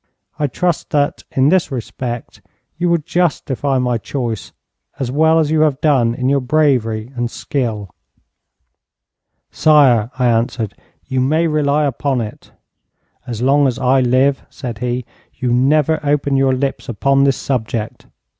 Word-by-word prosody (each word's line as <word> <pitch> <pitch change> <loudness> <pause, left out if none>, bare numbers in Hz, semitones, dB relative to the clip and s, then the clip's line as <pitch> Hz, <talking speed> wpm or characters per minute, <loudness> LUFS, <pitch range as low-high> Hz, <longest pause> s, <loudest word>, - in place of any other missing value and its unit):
I 150 - +1
trust 175 +5 -2
that, 145 -1 0
in 135 +2 +2
this 180 -3 +2
respect, 120 -1 -6 0.3
you 175 +2 0
will 170 - +3
justify 145 -4 -1
my 125 -2 0
choice 115 - -4 0.5
as 130 -3 -3
well 160 +3 +3
as 155 -2 +1
you 155 -1 +2
have 150 -3 +2
done 130 -7 +2
in 125 0 -2
your 140 +1 +3
bravery 125 -5 +1
and 120 -1 -2
skill.' 110 - -3 1.6
'Sire,' 130 -8 +4
I 125 - +1
answered, 115 -2 0 0.3
'you 130 -1 -1
may 155 +6 +2
rely 150 -1 +1
upon 140 -1 -1
it.' 110 -2 -7 0.8
'As 120 -1 -4
long 140 +2 +4
as 125 -2 -2
I 130 0 +2
live,' 130 +3 +2
said 120 -4 -7
he, 125 0 -2 0.3
'you 125 -2 -1
never 150 +5 +2
open 145 -1 +1
your 135 -1 +3
lips 135 0 -3
upon 135 +5 +2
this 135 -1 +2
subject.' 115 -4 -3
135 Hz, 145 wpm, -17 LUFS, 120-145 Hz, 1.6 s, Sire